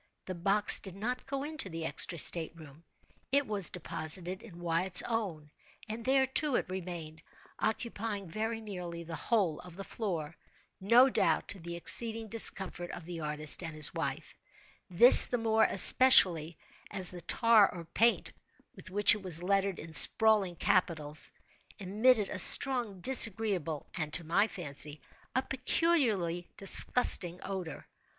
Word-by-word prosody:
The 185 - -8
box 195 +4 +2
did 190 -2 -12
not 245 +5 -7
go 275 0 -6
into 310 -9 -7
the 165 -1 -8
extra 170 +1 -1
state 160 +4 0
room. 155 -1 -17 0.5
It 280 +1 0
was 205 -5 -4
deposited 175 +2 -8
in 180 -7 -16
Wyatt's 175 +2 -1
own; 185 -11 -7 0.4
and 220 +2 -9
there, 265 +1 0
too, 270 +1 -1
it - - -3
remained, 170 -4 -10 0.4
occupying 220 -2 -6
very 220 +5 -7
nearly 180 -5 -10
the 165 0 -10
whole 190 -6 -3
of 180 -1 -15
the 195 - -9
floor—no 200 - -3
doubt - - -2
to 200 - -4
the 170 0 -10
exceeding 225 +5 0
discomfort 190 -5 -2
of 170 - -11
the 170 -1 -10
artist 150 0 -3
and 165 -3 -9
his 150 -1 +2
wife;—this 235 +8 +5
the 245 - -4
more 220 -1 -1
especially 175 -8 +5 0.3
as 190 -3 +3
the 180 -1 -9
tar 220 +3 +1
or 170 -2 -12
paint 230 +8 -2 0.4
with - - -13
which 205 +2 +1
it 210 - -8
was 175 -3 +3
lettered 195 0 -3
in 160 0 -12
sprawling 210 +1 +5
capitals, 155 -3 -3 0.5
emitted 215 +3 -1
a 190 - -6
strong, 235 -5 +4
disagreeable, 205 - -1
and, 155 -3 -6
to 170 - +1
my 190 +7 -1
fancy, 150 -5 -6 0.4
a 260 - -2
peculiarly 245 - -3
disgusting 185 -3 +3
odor. 185 -5 -9
190 Hz, 145 wpm, -28 LUFS, 170-225 Hz, 0.5 s, wife;—this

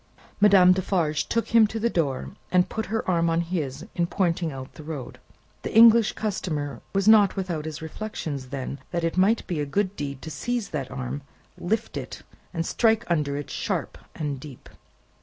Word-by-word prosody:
Madame 195 -3 +7
Defarge 170 -5 0
took 230 - 0
him 230 -2 +6
to 225 +2 -4
the 230 - +2
door, 150 - -1 0.2
and 180 -1 +4
put 220 -1 -3
her 225 +3 -2
arm 170 -2 +2
on 165 +1 +2
his, 155 -6 -3
in 170 -1 0
pointing 170 -3 0
out 130 -1 -8
the - - -11
road. 150 -5 -7 0.4
The - - -4
English 230 -1 +7
customer 155 -9 -3
was 195 +1 0
not 210 -3 +6
without 175 -6 -3
his 160 0 -6
reflections 160 -6 -5
then, 135 +1 -5
that 170 -1 -2
it 165 - 0
might 200 +5 +3
be 170 -4 -3
a 145 - 0
good 195 +6 0
deed 140 -4 -5
to 160 - -6
seize 240 +4 -2
that 135 -4 -4
arm, 135 +2 -5 0.3
lift 220 +5 -2
it, - - -7 0.3
and 165 -2 -2
strike 225 +2 +2
under 145 -4 +1
it 145 - -6
sharp - - -2 0.2
and 145 -3 -3
deep. 135 -2 -11
170 Hz, 185 wpm, -25 LUFS, 145-205 Hz, 0.4 s, Madame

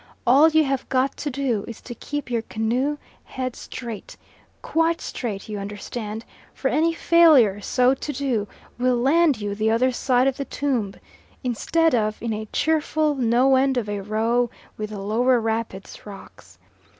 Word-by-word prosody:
All 280 +6 +6
you 315 0 +4
have 270 -2 -2
got 260 +1 +1
to 295 - -3
do 255 -6 -1
is 230 - -8
to 245 - -8
keep 290 +2 -6
your 235 -1 +1
canoe 240 +7 -1 0.3
head 255 -1 -5
straight 235 -5 -8 0.5
quite 330 +1 +1
straight, 210 -6 -5
you 210 -2 -5
understand 210 +2 -6 0.3
for - - -1
any 325 +2 +2
failure 310 - +5
so 250 +5 +3
to 280 +2 -5
do 250 -7 -1 0.3
will 250 0 +2
land 285 +2 +3
you 205 -1 -3
the 215 +2 0
other 245 +3 +2
side 250 0 +2
of 270 -1 +1
the 275 - -3
tomb, 245 -11 -2 0.5
instead 320 +7 +1
of 215 -2 0
in 230 -1 -3
a 215 0 -5
cheerful 310 +2 +1
no 255 +1 +3
end 265 0 +2
of 230 -4 -1
a 205 -1 -3
row 225 +4 0 0.3
with 215 0 -5
the 215 - -7
lower 235 +5 +2
rapid's 220 -3 -4
rocks. 200 -2 -13
245 Hz, 165 wpm, -23 LUFS, 220-275 Hz, 0.5 s, All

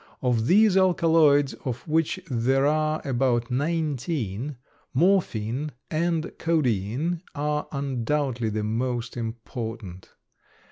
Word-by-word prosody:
Of 120 -3 +1
these 210 +3 +5
alkaloids, 165 -6 +4
of 125 +2 -4
which 160 +3 +1
there 135 +1 +1
are 155 +1 +1
about 120 -2 +1
nineteen, 145 - -2 0.4
morphine 150 - +1 0.2
and 165 0 0
codeine 150 - 0
are 150 +1 -1
undoubtedly 135 -3 -1
the 105 0 -2
most 120 +2 -2
important. 115 -4 -6
135 Hz, 95 wpm, -25 LUFS, 120-155 Hz, 0.4 s, these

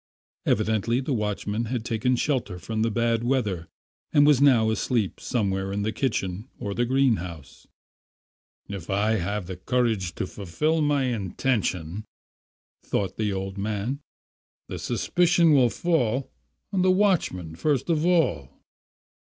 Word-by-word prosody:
Evidently 110 +2 +1
the 135 +1 -2
watchman 105 0 -2
had 120 0 -3
taken 120 +2 +1
shelter 125 -8 -1
from 110 +4 -3
the 115 - +2
bad 115 +1 +1
weather 105 -10 0 0.4
and 145 0 +5
was 145 -3 +5
now 120 -6 +5
asleep 110 -2 -1
somewhere 95 -4 -1
in 100 +1 -2
the 110 - 0
kitchen 105 -2 -2
or 100 - -4
the 120 +4 +1
greenhouse. 105 - -1 1.0
"If 100 -4 -7
I 105 +3 +2
have 100 +1 -2
the 90 0 -6
courage 110 -5 0
to - - -2
fulfil 150 - -1
my 145 -2 +2
intention," 105 -5 -1 0.8
thought 100 -2 -2
the 105 -2 0
old 95 0 -4
man, 105 +6 -2 0.7
"the - - -6
suspicion 170 +5 +3
will 130 -4 +5
fall 135 -5 0 0.4
on 190 - +2
the 185 - +4
watchman 180 - +1
first 145 - 0
of 160 -3 +1
all." 150 - +2
110 Hz, 135 wpm, -25 LUFS, 100-135 Hz, 1.0 s, and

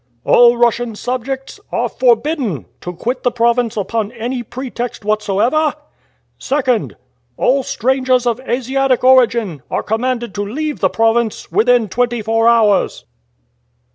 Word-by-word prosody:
All 240 0 +5
Russian 235 -1 +1
subjects 260 - -4
are - - 0
forbidden 295 - 0 0.2
to 180 - -5
quit 240 +8 -4
the 245 - +2
province 235 -1 0
upon 215 +1 -2
any 245 +2 -4
pretext 240 -2 -6
whatsoever. 215 +9 +1 0.6
"2nd. 260 -5 0 0.4
All 270 +2 +2
strangers 255 0 0
of 240 0 0
Asiatic 260 +1 0
origin 235 - +3
are - - -2
commanded 240 0 -2
to 205 - -3
leave 295 +8 -4
the 190 - +2
province 225 +1 0
within 245 -1 +3
twenty 240 +3 -1
four 225 +1 +2
hours." 220 -4 +2
240 Hz, 125 wpm, -16 LUFS, 225-255 Hz, 0.6 s, All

